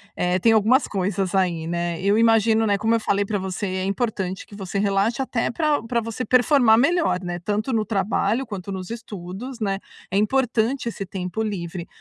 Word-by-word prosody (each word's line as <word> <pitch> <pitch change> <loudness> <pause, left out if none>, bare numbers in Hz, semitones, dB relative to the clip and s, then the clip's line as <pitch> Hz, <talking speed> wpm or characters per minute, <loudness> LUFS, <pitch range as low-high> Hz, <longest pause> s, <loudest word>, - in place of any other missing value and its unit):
eh, 180 +1 +1
tem 225 +4 +4
algumas 225 +6 +4
coisas 195 -1 -1
aí, 175 -4 0
né. 170 0 -2
Eu 200 +2 +3
imagino, 225 -1 +4
né, 205 -2 +2
como 220 +3 +2
eu - - +1
falei 200 -2 0
pra 205 +1 -1
você: 190 +1 -4
é 185 0 -2
importante 195 -2 -2
que 205 - -13
você 195 -1 -4
relaxe 205 +5 +1
até 250 -3 -1
pra 300 -1 0
pra 235 +1 0
você 230 +2 -4
performar 250 -2 +4
melhor, 325 - +2
né, 175 -1 -4
tanto 210 +7 -2
no 220 -1 +1
trabalho, 210 +4 0
quanto 200 -3 -6
nos 185 -2 -5
estudos, 225 +2 -7
né. 195 -3 -1 0.3
É 190 - -3
importante 240 +2 +1
esse 210 -3 -4
tempo 185 +3 -4
livre. 175 -4 -4
205 Hz, 190 wpm, -23 LUFS, 190-230 Hz, 0.3 s, tem